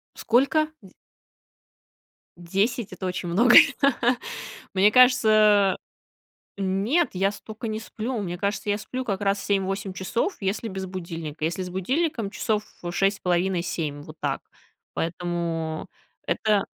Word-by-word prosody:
Сколько? 275 +6 +2
Дь 190 - -15 1.4
10 195 +6 -1
это 185 - -5
очень 180 -1 -3
много. 235 +8 +5 1.2
Мне 200 +3 +5
кажется 215 -6 +5 0.8
нет, 200 - +1
я 195 +1 +1
столько 220 +2 -7
не 215 0 -2
сплю. 225 +2 -4
Мне 175 -3 -4
кажется, 200 +2 -2
я 205 0 +1
сплю 255 +4 -5
как 200 -5 -2
раз 200 0 +1
7-8 195 -1 -1
часов, 230 - -2
если 200 +3 -2
без 190 -1 -5
будильника. 165 -4 -6
Если 170 +4 -1
с 180 - -6
будильником 230 - -1
часов 210 +2 -1 0.3
6,5, 185 -1 +1
7. 155 -4 -3
Вот 155 +1 -12
так. - - -1 0.5
Поэтому 165 -2 -3 0.4
это 210 -2 +1
195 Hz, 120 wpm, -25 LUFS, 180-220 Hz, 1.4 s, много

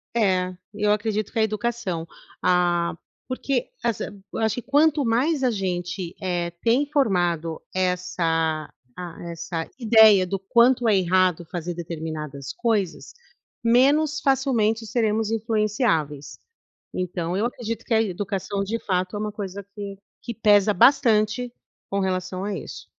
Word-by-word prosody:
É, 185 -5 +2 0.2
eu 210 0 +1
acredito 215 -1 -1
que 230 - -2
a - - +4
educação. 215 -5 -2 0.4
Ah, 175 -2 +2 0.3
porque, 255 0 -2
assi 235 -3 -1 0.3
eu - - -3
acho 220 -1 +1
que 245 - -4
quanto 290 +1 +3
mais 265 +7 +1
a 255 - +4
gente, 180 -2 -3
eh, 175 -2 -1
tem 245 +5 +3
formado 175 - 0
essa, 165 -4 0 0.3
ah, 175 -2 -7
essa 165 0 -5
ideia 220 -5 +6
do 195 - -2
quanto 235 +5 +3
é 205 - +4
errado 180 -2 +2
fazer 175 +1 -5
determinadas 155 -4 -6
coisas, 215 -7 -1 0.5
menos 285 +6 +3
facilmente 245 -6 +1
seremos 220 -1 0
influenciáveis. 210 - 0 0.6
Então, 180 -1 -2
eu 215 - +1
acredito 230 -2 -4
que - - -1
a 220 - +5
educação, 195 0 -2
de 225 +4 -2
fato, 185 -2 -1
é - - -3
uma 210 0 -3
coisa 200 -1 -6
que 200 -2 -6 0.3
que 235 - -5
pesa 210 -2 +4
bastante 235 0 +3 0.4
com 200 - -1
relação 185 -1 -2
a 205 0 -2
isso. - - -9
205 Hz, 140 wpm, -24 LUFS, 180-230 Hz, 0.6 s, ideia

